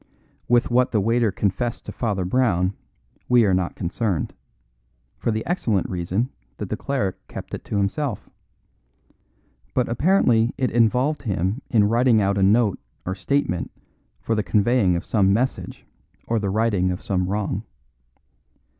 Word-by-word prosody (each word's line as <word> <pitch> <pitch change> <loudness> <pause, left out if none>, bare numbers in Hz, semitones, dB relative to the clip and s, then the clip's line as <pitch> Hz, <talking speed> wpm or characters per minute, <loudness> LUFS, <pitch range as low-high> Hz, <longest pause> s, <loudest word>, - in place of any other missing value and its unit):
With 120 0 +3
what 125 +1 +3
the 110 - +2
waiter 115 +1 +2
confessed 115 +5 -2
to - - -6
Father 100 -6 -2
Brown 95 -4 +1 0.6
we 120 -2 +5
are 95 - +2
not 90 -1 0
concerned, 90 - -2 0.9
for - - -1
the 110 0 -1
excellent 115 - 0
reason 95 +8 -1 0.3
that - - -5
that - - -2
cleric 105 -10 -2
kept - - -9
it - - -5
to - - -2
himself; 105 +4 -1 1.5
but 125 -1 +2
apparently 120 - +2
it 130 -2 0
involved 125 +6 +2
him 100 +1 -1
in 110 -4 +4
writing 115 +2 +3
out 100 0 +1
a - - +1
note 105 +1 +3 0.3
or 95 - -2
statement 95 -3 -1 0.5
for 115 - -2
the 110 - +1
conveying 105 -1 +2
of 85 - -3
some 100 -3 +2
message 125 +6 -2 0.4
or 115 -1 0
the 100 -2 -2
righting 100 -3 +1
of 90 0 -4
some 90 -2 0
wrong. 100 +1 -2
110 Hz, 150 wpm, -23 LUFS, 95-120 Hz, 1.5 s, we